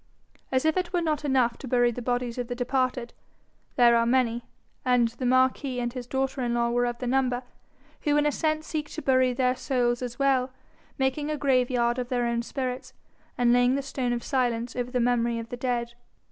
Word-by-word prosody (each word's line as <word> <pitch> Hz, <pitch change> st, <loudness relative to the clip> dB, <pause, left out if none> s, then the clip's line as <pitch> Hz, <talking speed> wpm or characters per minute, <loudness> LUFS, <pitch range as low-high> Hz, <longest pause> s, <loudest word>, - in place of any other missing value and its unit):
As 260 Hz, +2 st, +1 dB
if 315 Hz, +2 st, +2 dB
it 365 Hz, -1 st, -1 dB
were 355 Hz, -, +2 dB
not 310 Hz, -3 st, -1 dB
enough 255 Hz, -4 st, +1 dB
to 270 Hz, -, -8 dB
bury 245 Hz, -1 st, +3 dB
the 245 Hz, -, -6 dB
bodies 245 Hz, 0 st, -2 dB
of 245 Hz, -, -3 dB
the 245 Hz, -, -4 dB
departed, 255 Hz, -1 st, -1 dB, 0.6 s
there 240 Hz, -2 st, +6 dB
are 230 Hz, 0 st, +3 dB
many, 240 Hz, -2 st, +1 dB, 0.4 s
and 245 Hz, -2 st, +3 dB
the 245 Hz, +2 st, -4 dB
marquis 255 Hz, +1 st, +2 dB
and 240 Hz, -1 st, -2 dB
his 250 Hz, -2 st, -6 dB
daughter 265 Hz, +1 st, -1 dB
in 240 Hz, -1 st, 0 dB
law 235 Hz, 0 st, +1 dB
were 245 Hz, 0 st, +1 dB
of 240 Hz, 0 st, -3 dB
the 250 Hz, -, -5 dB
number, 250 Hz, 0 st, +1 dB, 0.6 s
who 295 Hz, -1 st, +2 dB
in 295 Hz, -, +3 dB
a 295 Hz, -, +3 dB
sense 310 Hz, 0 st, -1 dB
seek 300 Hz, -2 st, -4 dB
to 315 Hz, -, -6 dB
bury 255 Hz, -1 st, +3 dB
their 250 Hz, 0 st, +1 dB
souls 245 Hz, -2 st, 0 dB
as 245 Hz, -1 st, -5 dB
well, 270 Hz, -2 st, +2 dB, 0.5 s
making 270 Hz, +2 st, 0 dB
a 305 Hz, -, -1 dB
graveyard 250 Hz, -3 st, +1 dB
of 250 Hz, -1 st, -4 dB
their 245 Hz, -1 st, 0 dB
own 235 Hz, 0 st, 0 dB
spirits, 255 Hz, +1 st, -4 dB, 0.4 s
and 240 Hz, -1 st, +4 dB
laying 245 Hz, +1 st, +4 dB
the 280 Hz, -, -2 dB
stone 260 Hz, -2 st, -2 dB
of 240 Hz, -1 st, -2 dB
silence 240 Hz, -2 st, -1 dB
over 245 Hz, 0 st, -2 dB
the 250 Hz, 0 st, -1 dB
memory 235 Hz, -1 st, +1 dB
of 230 Hz, 0 st, -6 dB
the -, -, -4 dB
dead. 240 Hz, -1 st, -2 dB
250 Hz, 215 wpm, -26 LUFS, 240-265 Hz, 0.6 s, there